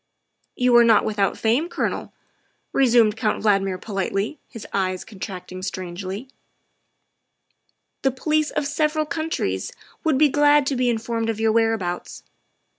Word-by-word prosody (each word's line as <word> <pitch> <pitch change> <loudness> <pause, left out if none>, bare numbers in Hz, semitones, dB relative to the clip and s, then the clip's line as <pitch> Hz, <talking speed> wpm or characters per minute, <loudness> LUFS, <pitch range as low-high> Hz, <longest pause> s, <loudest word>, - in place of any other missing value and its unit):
" - - -46
You 250 -1 +3
are 240 - +8
not 225 -2 +5
without 205 -2 0
fame, 245 +10 +1
Colonel," - - -3 0.6
resumed 235 -5 +4
Count 220 -3 -1
Valdmir 195 -3 +2
politely, 200 +6 -3
his 230 -4 -9
eyes 185 -2 -1
contracting 185 -3 -8
strangely; 185 +4 -5 0.8
" - - -49
the 270 - +3
police 305 +3 0
of - - -2
several 305 +1 0
countries 305 - -2 0.3
would 315 -4 +2
be 300 +2 +6
glad 290 0 +4
to 275 - 0
be 250 -1 +1
informed 230 0 -1
of 220 -1 -2
your 225 0 +2
whereabouts. 220 -6 -1
225 Hz, 140 wpm, -23 LUFS, 195-270 Hz, 0.8 s, are